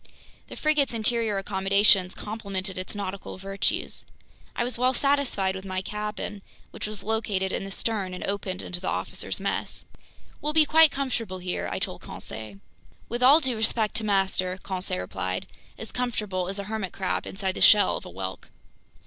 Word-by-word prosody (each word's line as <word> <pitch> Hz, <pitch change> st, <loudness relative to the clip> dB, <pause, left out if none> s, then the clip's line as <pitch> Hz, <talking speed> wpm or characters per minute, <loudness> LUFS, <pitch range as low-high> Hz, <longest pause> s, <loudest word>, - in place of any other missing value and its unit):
The -, -, -9 dB
frigate's 300 Hz, -5 st, +2 dB
interior 225 Hz, -2 st, +2 dB
accommodations 195 Hz, -1 st, +3 dB
complemented 200 Hz, -3 st, -3 dB
its 185 Hz, +3 st, -4 dB
nautical 200 Hz, -2 st, -5 dB
virtues. 195 Hz, +1 st, 0 dB, 0.5 s
I -, -, +1 dB
was 250 Hz, +1 st, -1 dB
well 255 Hz, +2 st, +2 dB
satisfied 265 Hz, -9 st, +2 dB
with 190 Hz, -, -6 dB
my 185 Hz, -1 st, -2 dB
cabin, 210 Hz, 0 st, -4 dB, 0.3 s
which -, -, -4 dB
was 210 Hz, -2 st, -4 dB
located 205 Hz, -3 st, 0 dB
in -, -, -2 dB
the -, -, -6 dB
stern 195 Hz, -2 st, -1 dB
and -, -, -6 dB
opened 195 Hz, -2 st, -2 dB
into 175 Hz, -, -4 dB
the 185 Hz, -, -4 dB
officers' -, -, -2 dB
mess. -, -, -2 dB, 0.6 s
"We'll 300 Hz, +1 st, -1 dB
be 315 Hz, -1 st, +6 dB
quite 320 Hz, +1 st, +7 dB
comfortable 240 Hz, -9 st, -2 dB
here," 180 Hz, 0 st, -3 dB
I -, -, -1 dB
told -, -, -3 dB
Conseil. 110 Hz, -3 st, -8 dB, 0.5 s
"With 240 Hz, +2 st, -3 dB
all 275 Hz, +5 st, +8 dB
due 260 Hz, -4 st, 0 dB
respect 220 Hz, -1 st, +1 dB
to 225 Hz, -, -1 dB
master," 190 Hz, -2 st, +2 dB
Conseil 185 Hz, -, -3 dB
replied, 95 Hz, 0 st, -3 dB, 0.3 s
"as 225 Hz, -, -7 dB
comfortable 210 Hz, -7 st, -1 dB
as 195 Hz, -, -3 dB
a 200 Hz, -, -2 dB
hermit 215 Hz, -2 st, -3 dB
crab 190 Hz, -1 st, -1 dB
inside 190 Hz, -1 st, -1 dB
the -, -, -6 dB
shell 210 Hz, -1 st, +7 dB
of -, -, -5 dB
a -, -, -9 dB
whelk." 95 Hz, +1 st, -6 dB
200 Hz, 175 wpm, -27 LUFS, 185-230 Hz, 0.6 s, all